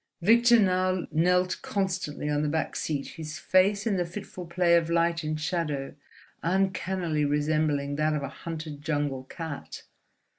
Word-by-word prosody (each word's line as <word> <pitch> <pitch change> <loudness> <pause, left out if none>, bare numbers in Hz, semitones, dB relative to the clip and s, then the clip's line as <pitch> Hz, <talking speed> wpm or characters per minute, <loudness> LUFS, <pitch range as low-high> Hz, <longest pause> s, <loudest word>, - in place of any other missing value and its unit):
Victor 235 +4 +6
now 185 -2 +2
knelt 180 +3 +2
constantly 185 -7 -2
on 150 0 +1
the 150 - 0
back 160 +1 -1
seat, 145 -3 -2
his 155 -2 -7
face 200 +3 +3
in 210 -4 +1
the 180 - +1
fitful 180 0 -8
play 170 0 +3
of 165 -1 +2
light 170 0 +1
and 155 0 -2
shadow 155 -4 -2 0.5
uncannily 185 -3 0
resembling 145 -1 0
that 155 0 +1
of 145 - -2
a 140 - -3
hunted 155 0 -7
jungle 145 -4 -2
cat. 160 0 -7
165 Hz, 150 wpm, -27 LUFS, 150-185 Hz, 0.5 s, Victor